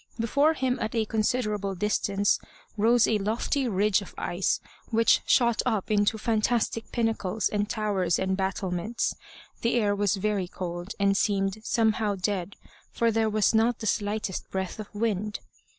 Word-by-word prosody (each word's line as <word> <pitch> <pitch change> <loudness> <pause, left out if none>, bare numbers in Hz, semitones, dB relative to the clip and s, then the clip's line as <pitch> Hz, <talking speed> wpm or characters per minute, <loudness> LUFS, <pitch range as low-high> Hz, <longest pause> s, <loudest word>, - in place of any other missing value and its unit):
Before 285 +7 +3
him, 260 -2 0
at 220 - -2
a 225 -1 +1
considerable 210 -3 -1
distance, 200 +1 +1 0.4
rose 230 +2 +4
a 215 - +1
lofty 235 +6 0
ridge 205 -1 +2
of 200 - -11
ice, 180 +2 0 0.3
which 230 0 +4
shot 235 -2 +3
up 220 -5 -1
into 205 +1 +2
fantastic 225 +1 0
pinnacles 225 -3 0
and 205 0 -1
towers 200 -6 0
and 190 0 0
battlements. 190 +2 -2 0.5
The 235 - +1
air 205 -4 +2
was 205 0 +1
very 200 -1 -1
cold, 175 +1 -6
and 200 0 +3
seemed 195 0 0
somehow 220 -2 +1
dead, 190 0 -2 0.4
for 230 -1 +1
there 220 0 +1
was 215 0 +2
not 225 +2 +3
the 220 - -7
slightest 210 -2 -2
breath 190 +1 -4
of 215 - -6
wind. 210 -1 -1
210 Hz, 150 wpm, -27 LUFS, 195-225 Hz, 0.5 s, rose